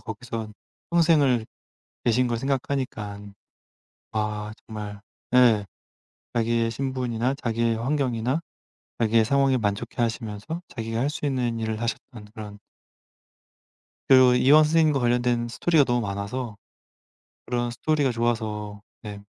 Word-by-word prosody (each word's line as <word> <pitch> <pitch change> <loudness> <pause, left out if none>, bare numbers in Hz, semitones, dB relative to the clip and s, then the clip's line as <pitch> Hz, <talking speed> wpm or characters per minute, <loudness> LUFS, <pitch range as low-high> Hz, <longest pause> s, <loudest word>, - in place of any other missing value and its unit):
거기서 110 0 -6 0.4
평생을 150 -9 +4 0.6
계신 125 +2 +3
걸 120 -1 -1
생각하니깐 115 -6 -3 0.8
아 105 -1 -2
정말 105 -2 -7 0.3
예 120 -5 +5 0.7
자기의 115 0 +1
신분이나 130 0 -1
자기의 115 -3 0
환경이나 130 +1 0 0.6
자기의 115 0 +4
상황에 135 +2 +3
만족해하시면서 110 +5 -2
자기가 115 -1 -4
할 140 +4 +1
수 150 - -6
있는 125 -4 -1
일을 110 0 -2
하셨던 115 -1 -5
그런 105 -1 -8 1.5
그리고 130 -2 +7
이황 145 +5 +6
선생님과 155 -2 +3
관련된 120 -1 +1
스토리가 155 +5 +3
너무 120 -2 +1
많아서 100 +3 -4 0.9
그런 120 -1 -1
스토리가 145 +1 +1
좋아서 110 -3 -2 0.2
네. 100 -2 -8
120 Hz, 280 characters per minute, -25 LUFS, 110-130 Hz, 1.5 s, 그리고